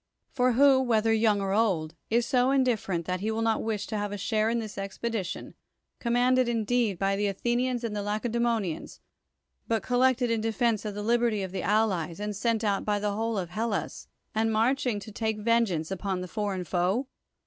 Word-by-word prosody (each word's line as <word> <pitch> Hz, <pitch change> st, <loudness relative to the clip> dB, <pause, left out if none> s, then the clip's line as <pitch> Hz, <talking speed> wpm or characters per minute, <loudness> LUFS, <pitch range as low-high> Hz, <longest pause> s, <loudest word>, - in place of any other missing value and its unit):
For 250 Hz, -1 st, +2 dB
who, 270 Hz, +1 st, +5 dB
whether 225 Hz, -3 st, +2 dB
yt'ung 215 Hz, -2 st, +3 dB
or 195 Hz, 0 st, -1 dB
old, 185 Hz, -8 st, +1 dB, 0.2 s
is 235 Hz, +1 st, +2 dB
so 250 Hz, 0 st, +2 dB
indifferent 230 Hz, -10 st, +1 dB
that 180 Hz, +1 st, -2 dB
he 210 Hz, +4 st, -2 dB
will 220 Hz, +1 st, -1 dB
not 225 Hz, -1 st, +1 dB
wish 215 Hz, -2 st, -2 dB
to 215 Hz, -, -4 dB
have 205 Hz, 0 st, -3 dB
a 205 Hz, -, -4 dB
share 215 Hz, +2 st, +1 dB
in 235 Hz, -, 0 dB
this 220 Hz, -2 st, -5 dB
expedi 200 Hz, +2 st, -3 dB
tion, 180 Hz, -, -7 dB, 0.5 s
commanded 245 Hz, +1 st, +2 dB
indeed 230 Hz, -3 st, +1 dB
by 195 Hz, +2 st, +1 dB
the 205 Hz, +1 st, 0 dB
Athenians 240 Hz, +5 st, -1 dB
and 230 Hz, -2 st, -2 dB
Lacedtemonians, 215 Hz, -2 st, -2 dB, 0.7 s
but 225 Hz, -1 st, 0 dB
collected 250 Hz, -1 st, +2 dB
in 225 Hz, -1 st, +1 dB
defense 225 Hz, -1 st, 0 dB
of 210 Hz, -1 st, -4 dB
the 205 Hz, -, -4 dB
liberty 230 Hz, -2 st, +1 dB
of 190 Hz, -, -5 dB
the 190 Hz, -, -3 dB
allies, 195 Hz, -5 st, 0 dB
and 210 Hz, 0 st, -3 dB
sent 225 Hz, +2 st, 0 dB
out 200 Hz, -2 st, +1 dB
by 210 Hz, -1 st, 0 dB
the 205 Hz, 0 st, -1 dB
whole 225 Hz, +1 st, -1 dB
of 180 Hz, -3 st, -3 dB
Hellas, 215 Hz, +2 st, -3 dB, 0.3 s
and 225 Hz, +1 st, +1 dB
marching 235 Hz, 0 st, +1 dB
to 205 Hz, +2 st, -10 dB
take 220 Hz, 0 st, -2 dB
vengeance 210 Hz, -7 st, +1 dB
upon 190 Hz, -1 st, -2 dB
the 180 Hz, -, -5 dB
foreign 200 Hz, -2 st, -2 dB
foe? 180 Hz, -, 0 dB
220 Hz, 190 wpm, -28 LUFS, 200-235 Hz, 0.7 s, who